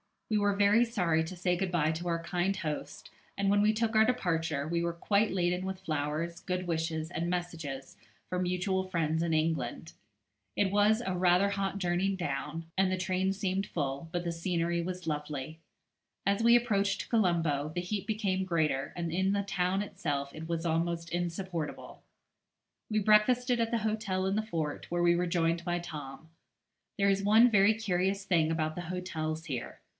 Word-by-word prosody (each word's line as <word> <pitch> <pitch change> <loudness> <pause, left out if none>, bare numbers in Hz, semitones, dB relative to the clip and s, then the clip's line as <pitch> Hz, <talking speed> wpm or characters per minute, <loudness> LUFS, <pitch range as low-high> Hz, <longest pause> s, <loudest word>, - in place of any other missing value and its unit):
We 215 - +3
were 205 -1 +2
very 205 +4 +5
sorry 170 -8 +1
to 185 - -7
say 180 0 0
good 190 0 -1
bye 155 -2 +2
to 165 +2 -4
our 165 -1 -1
kind 180 +3 0
host, 155 -6 -5 0.3
and 195 0 +1
when 205 +1 +4
we 215 +1 +4
took 225 0 0
our 220 0 +6
departure, 165 - 0
we 170 +1 0
were 170 0 -1
quite 200 +5 +1
laden 180 0 0
with 190 0 -4
flowers, 155 0 -2
good 180 0 -3
wishes, 160 -1 -2
and 170 +1 -2
messages 165 -7 -4 0.3
for 180 - -1
mutual 185 +1 0
friends 165 -3 0
in 170 -1 0
England. 160 -1 -1 0.6
It 195 -2 +2
was 210 +3 +3
rather 180 +1 +3
a - - -2
hot 195 0 -2
journey 185 +2 +1
down, 165 -1 -3
and 190 0 +3
the 185 - 0
train 185 +1 0
seemed 195 0 -1
full, 140 0 -3
but 175 0 -1
the 170 - -2
scenery 170 0 -1
was 180 0 -5
lovely. 150 0 -4 0.7
As 200 +3 +2
we 235 +1 +6
approached 200 -5 +1
Colombo 165 - +1
the 175 - 0
heat 200 +3 -3
became 200 -4 0
greater, 155 -6 0
and 170 -2 -3
in 190 +3 +1
the 200 0 0
town 190 0 0
itself 145 -9 -3
it 160 +1 -7
was 170 0 -2
almost 170 +1 -1
insupportable. 175 -2 -4 0.9
We 215 -1 +1
breakfasted 235 +4 +4
at 230 -1 +1
the 235 0 0
hotel 215 -4 -1
in 195 +2 0
the - - +2
fort, 165 -9 -4
where 175 0 0
we 175 0 +5
were 175 +1 0
joined 170 0 0
by 175 -1 0
Tom. 155 -3 -8 0.7
There 200 -1 +3
is 195 0 +2
one 220 +4 +6
very 205 +1 +5
curious 195 -2 0
thing 170 -5 +2
about 155 -1 -1
the 175 - -4
hotels 160 -3 -3
here. 130 -7 -5
180 Hz, 180 wpm, -30 LUFS, 165-195 Hz, 0.9 s, our